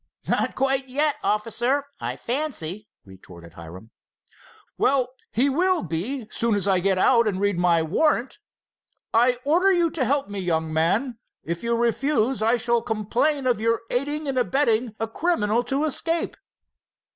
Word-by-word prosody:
"Not - - 0
quite 270 0 0
yet, 290 +3 +1
officer, 235 +6 0
I - - -3
fancy," 225 - -3 0.2
retorted 90 -3 -14
Hiram. 90 +7 -12 0.8
"Well, 260 -2 +2 0.2
he 250 +5 +2
will 360 +6 +1
be 205 - -4
soon 230 -2 +1
as 205 -1 0
I 190 -2 +3
get 190 +1 +1
out 235 +4 +4
and 195 -3 -1
read 200 -3 0
my 170 -2 +3
warrant. 255 - 0 0.7
I 245 +2 +4
order 350 +7 +3
you 345 -3 +2
to 290 - -1
help 275 +2 0
me, 200 -1 -5
young 160 -3 -1
man. 210 - 0 0.2
If 170 +1 -4
you 235 0 0
refuse, 240 +1 0
I 230 +3 +3
shall 235 0 +1
complain 240 +7 -1
of 245 -4 +1
your 230 0 +1
aiding 290 +4 -1
and 265 -2 0
abetting 235 -1 +1
a 225 - -1
criminal 230 -5 0
to 275 +2 -1
escape." 330 +2 -1
235 Hz, 155 wpm, -24 LUFS, 200-275 Hz, 0.8 s, out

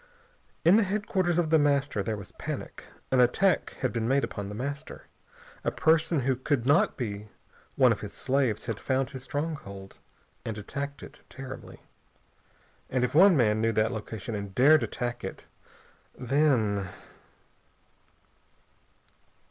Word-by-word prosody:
In 180 +5 +7
the 225 - +4
headquarters 190 -3 0
of 165 -2 +1
The 160 - +6
Master 140 -6 +1
there 110 +2 -2
was 95 -3 -10
panic. - - -6 0.3
An 130 - +3
attack 175 +10 +3
had 130 - 0
been 115 -1 -1
made 135 +2 +2
upon 100 -1 -4
The 105 - -6
Master. 140 +6 -5 0.6
A - - +1
person 160 -1 +2
who 130 +1 +1
could 130 -1 -1
not 145 +2 +3
be 105 -4 -4 0.5
one - - +5
of - - 0
his - - -6
slaves 130 -5 0
had 115 -4 -3
found 135 0 -1
his 130 -3 -7
stronghold 135 -10 -5 0.4
and 110 -2 -4
attacked 140 +7 -5
it - - -12
terribly. 130 0 -9 1.1
And 125 -1 0
if 125 - 0
one 180 +2 +7
man 110 -3 +3
knew 115 0 +2
that 110 +1 +2
location 110 0 -6
and 100 -2 -5
dared 150 +5 +6
attack 120 -1 -3
it, - - -7 0.7
then.... 125 -7 +1
130 Hz, 145 wpm, -28 LUFS, 110-150 Hz, 1.1 s, In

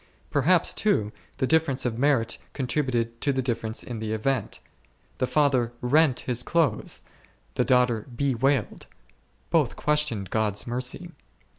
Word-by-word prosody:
Per 145 - +2
haps, 175 +5 +3
too, 110 - +1 0.3
the - - +1
difference 155 -3 +2
of 120 -1 -2
merit 130 -5 +2
contributed 120 -3 -1
to 145 - +2
the 130 -1 -1
difference 115 -2 -2
in 120 -3 -6
the 110 0 -3
event. 130 +5 -1 0.6
The 130 - +1
father 130 -6 +2
rent 140 +2 +3
his 125 -1 -1
clothes, 155 -10 0 0.5
the - - +1
daughter 125 -3 +2
bewailed, 135 -1 0 0.6
both - - +2
questioned 150 -11 0
God's 105 -2 0
mercy. 125 +8 -3
125 Hz, 135 wpm, -26 LUFS, 115-145 Hz, 0.6 s, haps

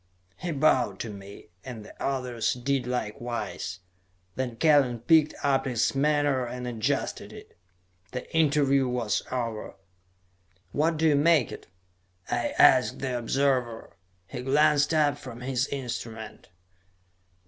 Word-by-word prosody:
He 175 - -4
bowed 140 -4 +2
to 115 - -5
me, 100 0 -11
and 115 -5 -8
the - - -12
others 125 -4 -1
did 125 0 -1
likewise. 110 -6 -4 0.5
Then 125 -3 -3
Kellen 135 -5 +3
picked 155 +3 +4
up 140 -1 +2
his 120 -4 +1
menore 145 -2 +1
and 125 +1 -6
adjusted 115 -3 -2
it. - - -13 0.6
The 125 - -5
interview 140 -4 +3
was 115 -6 -1
over. 115 -4 -4 1.0
"What 160 +2 +1
do 160 +1 +3
you 150 - +4
make 150 -3 +3
it?" - - -9 0.6
I - - -1
asked - - +5
the 130 -2 -3
observer. 125 -1 -1 0.3
He 125 +6 -7
glanced 150 +3 +3
up 150 -2 +2
from 125 -4 -9
his 130 +1 -1
instrument. 115 -7 -6
130 Hz, 125 wpm, -27 LUFS, 120-145 Hz, 1.0 s, asked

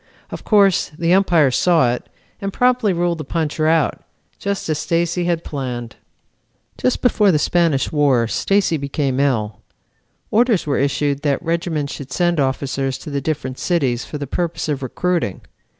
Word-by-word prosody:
Of - - -7
course, 200 -4 +3
the 170 +1 +2
Umpire 175 -7 +4
saw 130 -4 +3
it, 125 - -7 0.3
and 195 0 -2
promptly 250 -2 +2
ruled 175 -1 0
the - - -4
puncher 155 0 -1
out, 160 -1 +1 0.4
just 200 0 -3
as 155 -2 -1
Stacy 170 +2 0
had 170 -1 0
planned. 125 -5 -5 0.8
"Just 125 - -1
before 210 -5 +4
the 155 - +3
Spanish 165 -2 +1
War 140 -6 +2
Stacy 195 - +1
became 140 -1 -2
ill. 110 -7 0 0.7
Orders 230 -3 +3
were 145 -2 0
issued 140 +1 0
that 145 -2 +1
regiments 165 -3 -1
should 135 -2 -8
send 175 +1 +1
officers 135 0 -1
to 150 - -9
the 140 0 -2
different 135 -3 -3
cities 135 -9 0
for 150 - -6
the 145 - -4
purpose 170 +5 -3
of 145 -3 -2
recruiting. 160 - -2
155 Hz, 160 wpm, -19 LUFS, 135-175 Hz, 0.8 s, Umpire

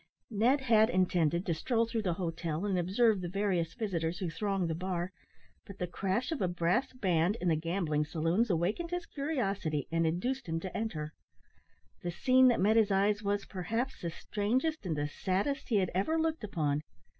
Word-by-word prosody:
Ned 240 +7 +3
had 225 -4 +4
intended 175 -2 +2
to 170 - +1
stroll 230 +8 +1
through 230 0 -2
the 180 -5 -1
hotel 165 -1 -3
and 200 -2 0
observe 195 +4 +2
the 175 - -3
various 185 -3 0
visitors 175 -7 -2
who 175 -3 -3
thronged 195 +1 -1
the 165 - -1
bar, 180 +1 -3 0.6
but 200 - -10
the 180 - -1
crash 195 - -2
of 320 - -2
a 185 - +2
brass 175 +9 +1
band 185 -4 +1
in 180 - +1
the 160 - +3
gambling 160 -2 0
saloons 165 +9 +1
awakened 195 - 0
his 355 0 -3
curiosity, 200 - -2
and 165 0 +2
induced 200 +7 -2
him 165 0 0
to 190 - -6
enter. 155 -9 -3 0.9
The 175 - -3
scene 255 +8 +4
that 245 - +3
met 215 +4 +4
his 220 -2 +4
eyes 205 +2 +2
was, 200 0 -1
perhaps, 225 +8 -3
the 170 - -2
strangest 220 - -1
and 160 - 0
the 145 0 0
saddest 195 - -2
he 230 - +2
had 190 -3 +2
ever 200 - +1
looked 320 -4 -1
upon. 150 -8 0
190 Hz, 190 wpm, -31 LUFS, 170-225 Hz, 0.9 s, had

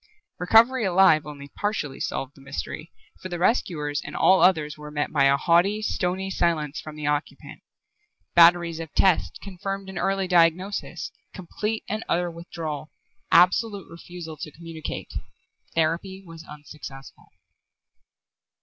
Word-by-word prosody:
Recovery 225 +7 +5
alive 180 -5 +4
only 140 -1 -9
partially 155 -8 -3
solved 135 +1 -3
the 140 - -18
mystery, 145 +3 -6 0.3
for 185 - -6
the 175 - -4
rescuers 160 - 0
and - - -8
all 190 - +5
others 155 -5 +3
were 150 0 -10
met 150 0 -2
by 140 -3 +3
a 140 0 +4
haughty, 175 +7 +3
stony 190 -2 -2
silence 160 -4 0
from 155 -1 -9
the 150 -1 -6
occupant. 145 +1 -3 0.7
Batteries 170 -1 +5
of 160 -2 -7
tests 190 -4 +2
confirmed 195 0 -5
an 190 - -5
early 195 -1 0
diagnosis: 180 +3 +1 0.2
complete 210 +4 -4
and 215 +2 -3
utter 175 0 0
withdrawal; 165 -3 -6 0.4
absolute 195 +2 +4
refusal 170 -1 -9
to 155 - -6
communicate. 165 0 -7 0.6
Therapy 170 +4 -1
was 165 -1 -11
unsuccessful. 145 -2 -11
170 Hz, 130 wpm, -25 LUFS, 150-190 Hz, 0.7 s, Recovery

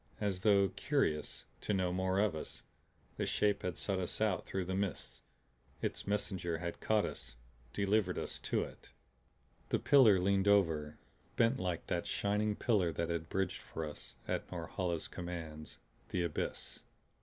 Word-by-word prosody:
As 100 -3 0
though 100 -2 +5
curious 135 - -1
to 105 - 0
know 90 -2 +1
more 95 +1 +1
of 100 -4 +3
us, 80 - -7 0.5
the - - 0
Shape 105 -1 +2
had 90 -1 -3
sought 100 -2 -1
us 90 - -2
out 105 -5 +1
through 95 -2 -2
the 95 - -2
mists, 95 -4 -2 0.6
its - - -3
messenger 95 -4 -1
had 85 0 -4
caught 110 -1 +3
us, 65 -1 -7 0.4
delivered 100 0 +1
us - - -4
to - - 0
it. - - -11 0.8
The - - +3
pillar 115 -9 +6
leaned 100 +1 +2
over 80 -7 +3 0.4
bent 115 +3 +3
like 90 -2 -2
that - - -1
shining 105 +1 +1
pillar 100 -8 +2
that 85 +2 -2
had 80 -1 -2
bridged 95 0 -1
for 80 - -5
us, 75 - -8
at - - -2
Norhala's 85 -3 -2
commands, 85 -4 -6 0.3
the 90 - 0
abyss. 85 -3 -3
95 Hz, 155 wpm, -35 LUFS, 85-100 Hz, 0.8 s, pillar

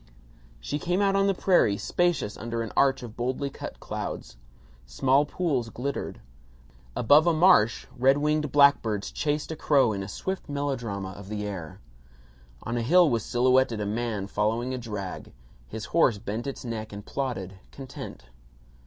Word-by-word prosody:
She 145 - -3
came 180 +4 0
out 200 -1 +2
on 195 0 +3
the 195 - +2
prairie, 175 - +3
spacious 175 - 0
under 115 +1 -3
an 115 - -6
arch 135 -2 +3
of 115 -3 -9
boldly 130 +3 -2
cut - - -8
clouds. - - -6 0.5
Small 135 - +2
pools 145 -10 -1
glittered. 135 +5 -4 0.7
Above 150 +7 +5
a 170 - +4
marsh 155 - +4
red 135 +2 +4
winged 150 -1 0
blackbirds 120 -8 +3
chased 150 +1 -2
a - - -3
crow 140 -7 +3
in 100 - -3
a 95 - -5
swift 190 - -5
melodrama 125 -9 -3
of 100 0 -11
the 105 -1 -3
air. 95 -6 -7 0.8
On 115 +1 -3
a - - 0
hill 165 +5 +5
was 115 -2 0
silhouetted 125 -1 +2
a 105 - -2
man 110 -1 -2
following 110 +5 -1
a 130 - -3
drag. 105 -5 -6 0.3
His 110 - -6
horse 135 -10 +4
bent 110 +4 -5
its 135 - -6
neck 110 -2 -5
and 100 0 -8
plodded, 95 -9 -4
content. 130 - -9
125 Hz, 160 wpm, -27 LUFS, 105-145 Hz, 0.8 s, Above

